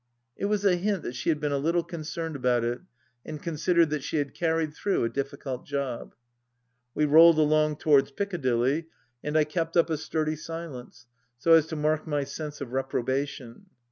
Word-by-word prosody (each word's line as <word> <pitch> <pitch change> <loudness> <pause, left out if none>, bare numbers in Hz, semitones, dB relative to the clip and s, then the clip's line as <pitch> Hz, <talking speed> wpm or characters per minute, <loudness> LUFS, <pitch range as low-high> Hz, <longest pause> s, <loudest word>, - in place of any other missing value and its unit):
It - - -3
was 205 0 0
a 185 -3 +4
hint 200 0 -1
that 120 - -4
she 125 - -3
had 155 -2 +1
been 150 -1 -1
a 140 - 0
little 170 +4 +1
concerned 165 -1 -5
about 125 -3 +1
it, 120 +4 -2 0.4
and 155 - -7
considered 165 -1 +1
she - - -2
had 145 -2 -2
carried 160 -2 0
through 195 -1 0
a 115 - +1
difficult 135 0 -4
job. 140 -4 -4 0.8
We 150 - +2
rolled 160 +2 +7
along 155 0 +3
towards 145 -2 +3
Piccadilly 140 -4 0 0.4
and 150 +1 0
I 155 - +5
kept 165 +2 -2
up 170 0 +3
a 160 - +1
sturdy 155 0 -2
silence, 155 -8 -8 0.3
so 165 +7 +4
as 160 -1 +6
to 160 - -5
mark 155 +1 0
my 145 -2 0
sense 145 +1 -7
of 130 -4 -6
reprobation. 130 +3 -3
150 Hz, 180 wpm, -27 LUFS, 140-165 Hz, 0.8 s, rolled